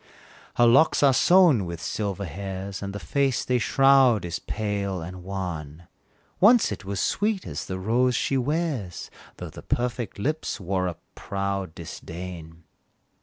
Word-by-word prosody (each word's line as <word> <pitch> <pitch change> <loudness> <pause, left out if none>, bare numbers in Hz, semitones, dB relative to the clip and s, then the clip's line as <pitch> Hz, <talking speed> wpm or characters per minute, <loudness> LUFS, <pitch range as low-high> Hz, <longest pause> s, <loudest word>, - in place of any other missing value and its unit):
Her 120 - +5
locks 135 +6 +5
are 140 -2 +6
sown 175 - +5
with 85 -1 -6
silver 100 +1 -3
hairs, 95 +2 -6
And 100 0 -4
the 100 - -6
face 140 0 0
they 125 -1 +1
shroud 135 -4 +4
is 85 -1 -4
pale 100 -3 -3
and 90 +2 -8
wan; 90 -5 -5 0.6
Once 225 - +6
it 95 -2 -5
was 100 0 -4
sweet 205 - 0
as - - -5
the 95 - -4
rose 120 +6 +1
she 135 - 0
wears, 135 - -2 0.3
Though - - -7
the - - -10
perfect 120 -3 -2
lips 155 +9 -2
wore 95 -1 -1
a 85 - -4 0.2
proud 100 -3 -3
disdain! 85 0 -8
100 Hz, 150 wpm, -25 LUFS, 90-130 Hz, 0.6 s, are